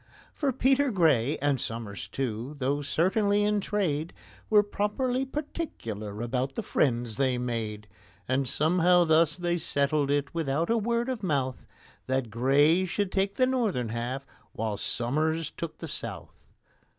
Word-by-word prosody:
For 285 -3 0
PETER 265 +2 +3
GRAY, 155 - +3
and 140 -3 +2
SOMERS 115 -3 -4
too, 125 +2 -4
though 140 +2 0
certainly 200 +8 +2
in 210 0 +2
trade, 175 -7 -1 0.4
Were 210 -1 +6
properly 245 +6 -1
particular 115 - -5
about 130 +3 -2
the - - -3
friends 120 -4 0
they 130 -2 +2
made; 110 -4 -3 0.4
And 130 +1 +1
somehow 175 +4 +4
thus 160 -1 +4
they 175 -1 0
settled 140 -1 +1
it 145 0 0
without 165 +2 0
a 230 - +3
word 235 +2 0
of 255 -4 -3
mouth— 140 -8 -1 0.4
That 130 -3 -1
GRAY 145 - +4
should 190 +2 -2
take 195 +1 0
the 255 - +4
northern 220 - 0
half, 120 +4 -3 0.3
while 110 -1 -2
SOMERS 155 +9 -1
took 170 -2 -5
the - - -7
south. - - -6
150 Hz, 145 wpm, -28 LUFS, 125-200 Hz, 0.4 s, Were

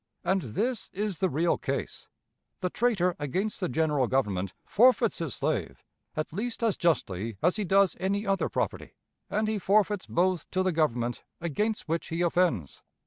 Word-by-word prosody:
And 190 0 +2
this 215 - -2
is 200 -4 -2
the 190 - +2
real 165 +3 +1
case. - - -4 0.5
The 180 -1 -1
traitor 195 -7 +1
against 185 +9 -2
the 180 - -1
General 150 -2 +1
Government 100 -8 0
forfeits 235 -1 +4
his 165 -8 -3
slave - - -2 0.3
at 155 0 -2
least 230 +5 -3
as 225 -4 +2
justly 115 - 0
as 180 +5 +3
he 210 - -1
does 195 -1 +4
any 200 +3 0
other 195 -1 +1
property; - - -3 0.3
and 215 +2 0
he 215 -1 0
forfeits 205 0 +2
both 180 -1 +1
to 185 - 0
the 185 - +2
Government 120 -7 0 0.2
against 210 +7 -1
which 165 +1 -1
he 165 +2 -1
offends. 170 - +1
180 Hz, 165 wpm, -28 LUFS, 150-205 Hz, 0.5 s, forfeits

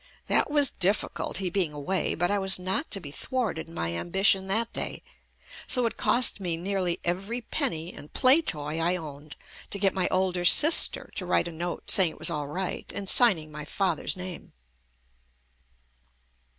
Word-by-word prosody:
That - - +2
w 295 - -7
r 295 - +5
as 280 - +6
difficult, 185 -3 0
he 185 -2 -3
being 180 -4 -1
away, 150 +6 -2
but 175 +3 -1
I 205 - +1
was 190 0 -1
not 190 - -2
to 195 - -1
be 145 -6 -9
thwarted 210 - -4
in 165 - -14
my 85 0 -3
ambition 190 - +1
that 225 +4 -1
day, - - -5 0.6
so 250 -1 +3
it 230 - -2
cost 245 -3 +3
me 175 -4 -3
nearly 185 -1 -2
every 195 +7 -2
penny 170 -5 -4
and 150 - -13
play 265 +5 +4
toy 150 - -2
I 170 +2 0
owned 150 -3 -9 0.3
to - - +5
get 195 -1 +1
my 185 -1 0
older 185 -1 -1
sister 305 - +6
to 185 - -2
write 175 - +1
a - - -7
note 170 +2 -3
saying 190 -4 +5
it - - -18
was - - +2
all 150 -1 -4
right 180 +5 -5
and 200 -1 -4
signing 185 -10 +2
my 150 0 -8
father's 180 +2 -2
name. 180 -1 -8
185 Hz, 185 wpm, -26 LUFS, 165-200 Hz, 0.6 s, as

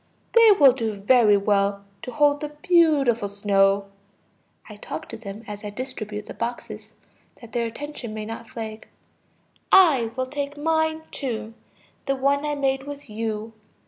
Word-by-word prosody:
They 460 -1 +7
will 285 -8 +7
do 225 -4 -2
very 210 +1 +4
well 200 0 0 0.2
to 250 - -7
hold 290 +1 +2
the 300 - -3
beautiful 295 - +2
snow. 200 0 +2 0.8
(I 210 - -10
talk - - -7
to - - -7
them 210 0 -9
as 205 0 -8
I 210 - -4
distribute 215 -2 -6
the - - -8
boxes, 235 +1 -6 0.5
that 235 -2 -13
their 235 0 -1
attention 270 -1 -7
may 215 0 -5
not 225 +1 -8
flag.) 220 -1 -7 0.8
I 300 -12 +6
will 260 0 -1
take 285 +2 -5
mine 315 +1 0
too, 230 -5 -4 0.5
the 275 - +1
one 280 +2 +1
I 295 - -1
made 270 -1 -1
with 285 -5 -9
you. 220 0 -4
240 Hz, 155 wpm, -24 LUFS, 215-285 Hz, 0.8 s, They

